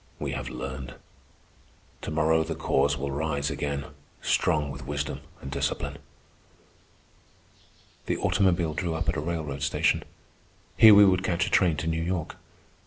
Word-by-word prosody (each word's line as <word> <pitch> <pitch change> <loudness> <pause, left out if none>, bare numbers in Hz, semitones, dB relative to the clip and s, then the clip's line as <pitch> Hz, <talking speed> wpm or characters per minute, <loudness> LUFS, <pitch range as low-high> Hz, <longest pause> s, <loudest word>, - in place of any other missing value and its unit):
We - - -3
have - - -4
learned. 65 -1 -6 1.1
To - - -5
morrow 80 +1 +2
the 80 0 -4
Cause 70 -2 +1
will 70 +1 -3
rise 70 0 -1
again, 70 0 -3 0.3
strong 75 -3 +1
with 65 0 -9
wisdom 75 0 -3 0.2
and 70 - -7
discipline." - - -2 2.1
The - - 0
automobile 85 -5 +1
drew 85 -1 -2
up 80 +1 -2
at - - 0
a - - -1
railroad 75 -4 -4
station. 75 - +1 0.7
Here 110 -2 +9
we 100 0 +9
would 95 -1 +3
catch 85 -2 +1
a - - -5
train 85 -5 +3
to 80 - -3
New 80 0 0
York. 85 -1 -3
80 Hz, 150 wpm, -27 LUFS, 70-85 Hz, 2.1 s, Here